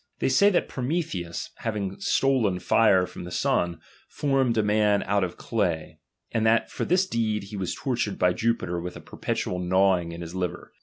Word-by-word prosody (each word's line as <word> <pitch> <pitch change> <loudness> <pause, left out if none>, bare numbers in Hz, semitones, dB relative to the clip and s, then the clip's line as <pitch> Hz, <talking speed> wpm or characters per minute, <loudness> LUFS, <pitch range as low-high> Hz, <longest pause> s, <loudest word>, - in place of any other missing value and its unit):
They - - 0
^H 200 +10 +5
e^y - - -1
that - - +2
FroQictheus, 125 - -3
having 100 -4 -3
stolen 125 -9 +2
fire 95 0 +4
from - - -9
the 90 - -4
Bun, 85 -1 +1 0.3
formed 135 -5 +1
a 110 - +3
^H - - -2
man 105 -1 +3
out 100 0 +1
of 90 - -4
clay, 90 -8 -2 0.3
and 110 - 0
that 110 0 +3
for - - -3
this 185 +2 +3
deed 110 - -1
he 100 +2 -9
was 95 -3 -3
tortured 120 -6 -2
by 90 0 +3
Jupiter 90 -4 -1
^H - - -6
wilh 90 - -6
It - - -13
perpetual 90 - -3
gnawing 90 -1 +2
in 85 +1 -7
his 85 0 -7
liver. 90 -2 -4
100 Hz, 200 wpm, -26 LUFS, 90-115 Hz, 0.3 s, ^H